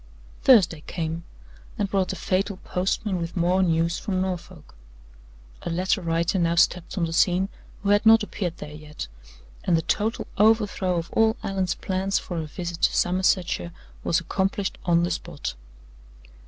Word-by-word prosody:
Thursday 180 - +5
came, 165 0 -3 0.5
and 205 - 0
brought 195 -1 +1
the 190 - -3
fatal 190 +2 -1
postman 185 +1 -1
with 170 +2 -5
more 180 +2 +3
news 170 -1 +1
from 190 -2 -2
Norfolk. 180 - -5 0.9
A - - -4
letter 185 +4 +1
writer 170 +2 0
now 170 -1 +2
stepped 175 +2 +2
on 170 - +2
the 165 - -4
scene 185 +2 +3 0.3
who 200 - 0
had 205 +1 +4
not 225 0 +7
appeared 180 -5 -4
there 150 0 -8
yet; 150 - -8 0.6
and 170 - +3
the 160 - -1
total 220 +2 0
overthrow 205 -4 +3
of 165 0 -4
all 220 0 +3
Allan's 190 -2 -1
plans 190 +1 -1
for 175 -2 -4
a 155 - -4
visit 170 +1 -6
to - - +3
Somersetshire 180 -1 +1 0.3
was 170 - +2
accomplished 190 +3 -1
on 170 -1 +3
the 175 - 0
spot. 75 - -4
180 Hz, 160 wpm, -25 LUFS, 170-195 Hz, 0.9 s, not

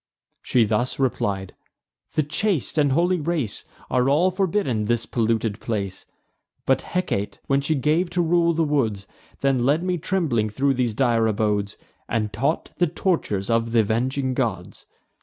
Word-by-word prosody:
She 120 -3 +2
thus 110 +4 -1
replied: 100 -7 -1 0.6
"The 155 - +2
chaste 155 - -1
and 145 -2 +3
holy 175 +4 +2
race 150 -9 -2 0.3
Are 125 +1 +2
all 170 +7 +3
forbidden 185 - 0
this 120 +1 0
polluted 115 -2 0
place. 100 -4 -4 0.6
But - - +2
Hecate, 105 - -2
when 140 0 +2
she 155 +3 0
gave 155 +6 +1
to - - +4
rule 170 0 +3
the 165 0 +1
woods, 115 -10 0 0.4
Then 135 -3 +2
led 145 +6 +2
me 180 -1 -1
trembling 145 - 0
thro' 135 +6 +1
these 125 -4 -1
dire 115 -3 +2
abodes, 105 -2 0 0.3
And 105 -3 -1
taught 140 +9 -1
the 175 - +4
tortures 150 - -1
of 115 0 +1
th' - - -1
avenging 130 +5 +1
gods. 110 -9 -3
130 Hz, 155 wpm, -23 LUFS, 110-160 Hz, 0.6 s, to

